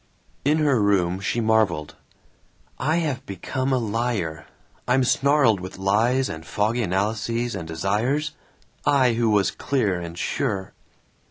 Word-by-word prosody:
In 150 +3 +3
her 145 -7 +2
room 95 -3 +2
she 115 +4 -1
marveled, 110 -9 +1 0.8
"I 155 +3 +1
have 145 -6 -1
become 130 +8 -3
a 130 - +3
liar. 110 -9 -2 0.4
I'm 130 +1 +3
snarled 135 -4 +3
with 95 +1 -8
lies 110 +7 +2
and 80 0 -6
foggy 105 +10 0
analyses 110 +4 -1
and 85 -5 -5
desires 110 - 0 0.5
I 135 -4 +3
who 115 0 +1
was 100 -4 +3
clear 105 -10 0
and 85 0 -7
sure." 100 -3 -2
110 Hz, 135 wpm, -24 LUFS, 95-130 Hz, 0.8 s, In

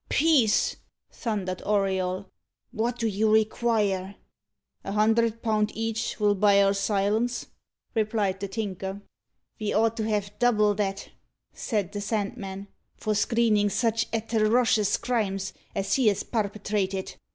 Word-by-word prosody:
"Peace!" 280 -9 +3 0.3
thundered 195 -5 -3
Auriol. 190 -2 0 0.5
"What 240 +1 -1
do 230 - -2
you 215 0 +1
require?" 215 -3 +1 0.7
"A 195 - -4
hundred 225 +2 +2
pound 215 -2 +1
each'll 225 -2 0
buy 200 0 +4
our 195 0 +3
silence," 210 +4 0 0.5
replied 210 -3 0
the 200 - -3
Tinker. 195 -1 -4 0.6
"Ve 215 -1 -2
ought 225 +1 +2
to 220 - -1
have 205 -2 -1
double 215 -4 +3
that," 195 -1 -3 0.4
said 205 -5 -2
the 205 -1 -4
Sandman, 200 -2 -3 0.3
"for 215 - -1
screenin' 210 -1 +2
sich 225 +1 0
atterocious 225 -1 +2
crimes 195 -6 -2 0.2
as 195 - -1
he 260 -4 +3
has 205 -2 +2
parpetrated. 200 -3 -2
210 Hz, 120 wpm, -26 LUFS, 200-225 Hz, 0.7 s, buy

